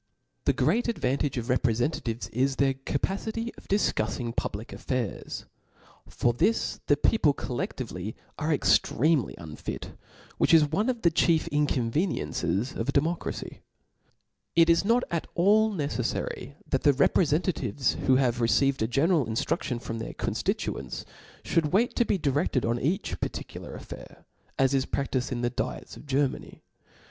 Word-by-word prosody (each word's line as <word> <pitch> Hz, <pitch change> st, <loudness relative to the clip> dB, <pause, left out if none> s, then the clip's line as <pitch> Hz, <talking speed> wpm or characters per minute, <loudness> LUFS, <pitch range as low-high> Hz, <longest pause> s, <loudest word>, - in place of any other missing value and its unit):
The -, -, +4 dB
great 240 Hz, -, +2 dB
advantage 140 Hz, -, 0 dB
of 120 Hz, -, -2 dB
rtprefentatives 120 Hz, -1 st, 0 dB
is 135 Hz, +3 st, +1 dB
their 135 Hz, 0 st, +2 dB
capacity 200 Hz, -, -3 dB
of -, -, -16 dB
difcuffing 115 Hz, -, 0 dB
public 105 Hz, +3 st, -3 dB
affairs. 125 Hz, -5 st, -3 dB, 0.6 s
For 120 Hz, -, +1 dB
this 220 Hz, -, +1 dB
the 145 Hz, -, +4 dB
people 145 Hz, -4 st, +3 dB
coUefltvely 110 Hz, -5 st, -4 dB, 0.2 s
are 155 Hz, +2 st, 0 dB
extremely 150 Hz, -2 st, +2 dB
unfit, 80 Hz, -2 st, -7 dB, 0.5 s
which 165 Hz, -, +5 dB
is 155 Hz, -2 st, +6 dB
one 195 Hz, -, 0 dB
of 240 Hz, -3 st, -2 dB
the; 170 Hz, -, +5 dB
chief 165 Hz, 0 st, +3 dB
inconveniences^ 140 Hz, -, 0 dB
of 115 Hz, -, -2 dB
a -, -, +4 dB
demo 155 Hz, +4 st, +2 dB
cracy^ 175 Hz, -, -6 dB, 1.0 s
It 170 Hz, 0 st, +6 dB
is 165 Hz, -, +3 dB
not 235 Hz, +4 st, +3 dB
at 170 Hz, -2 st, -1 dB
all 215 Hz, +5 st, +4 dB
necefTary 140 Hz, -, -3 dB
that 135 Hz, -, 0 dB
the 145 Hz, -, +5 dB
reprcfentatives 145 Hz, -, +2 dB
who 130 Hz, -, +6 dB
have 125 Hz, -2 st, +2 dB
received 130 Hz, +4 st, +2 dB
a 110 Hz, -, +2 dB
general 145 Hz, +3 st, +2 dB
inftrudion 115 Hz, +2 st, -1 dB
from 115 Hz, -1 st, -5 dB
their 115 Hz, -, -5 dB
conftituents, 65 Hz, -2 st, -3 dB, 0.4 s
(hould 155 Hz, -3 st, +1 dB
wait 230 Hz, +5 st, +3 dB
to 240 Hz, -, +4 dB
be 205 Hz, -, +1 dB
direfted 140 Hz, -5 st, 0 dB
on 120 Hz, +1 st, 0 dB
each 180 Hz, +10 st, -1 dB
particular -, -, -5 dB
affair, -, -, -11 dB, 0.3 s
as 135 Hz, 0 st, +3 dB
is 135 Hz, -1 st, +1 dB
praftifed 130 Hz, -2 st, -1 dB
in 120 Hz, -1 st, -2 dB
the 120 Hz, 0 st, 0 dB
diets 125 Hz, +1 st, -4 dB
of -, -, -13 dB
Ger 140 Hz, +1 st, +3 dB
many. -, -, -10 dB
140 Hz, 150 wpm, -27 LUFS, 120-165 Hz, 1.0 s, is